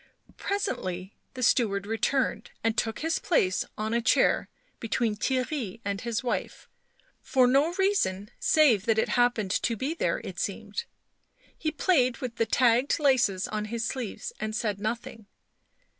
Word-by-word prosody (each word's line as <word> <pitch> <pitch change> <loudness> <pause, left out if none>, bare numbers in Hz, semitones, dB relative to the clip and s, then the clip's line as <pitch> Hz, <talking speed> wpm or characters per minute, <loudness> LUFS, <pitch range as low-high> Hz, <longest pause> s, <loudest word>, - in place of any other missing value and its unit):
Presently 190 - -3 0.2
the 255 - -3
steward 205 -5 +2
returned, 225 +5 0
and 225 0 +1
took 225 0 -1
his 325 +1 0
place 240 - +1
on 215 +1 -2
a 235 - +2
chair - - +3 0.3
between 230 -1 0
Theirry 255 -2 -2
and 200 0 -2
his 235 +1 -2
wife, 245 - -3 0.5
for 260 -2 +3
no 275 +7 +3
reason 280 - 0
save 250 -11 +4
that 225 -1 +3
it 220 - +1
happened 245 -5 +2
to 230 +3 0
be 275 +8 -2
there, 335 - 0
it - - -7
seemed. 465 - -3 0.7
He 315 - -2
played 280 -5 +2
with 250 -3 -6
the 230 - +1
tagged 245 +2 +3
laces 240 - +2
on 210 0 -2
his 225 +1 -3
sleeves 260 - -4
and 215 0 -3
said 210 -4 -1
nothing. 220 0 -4
235 Hz, 150 wpm, -27 LUFS, 215-270 Hz, 0.7 s, save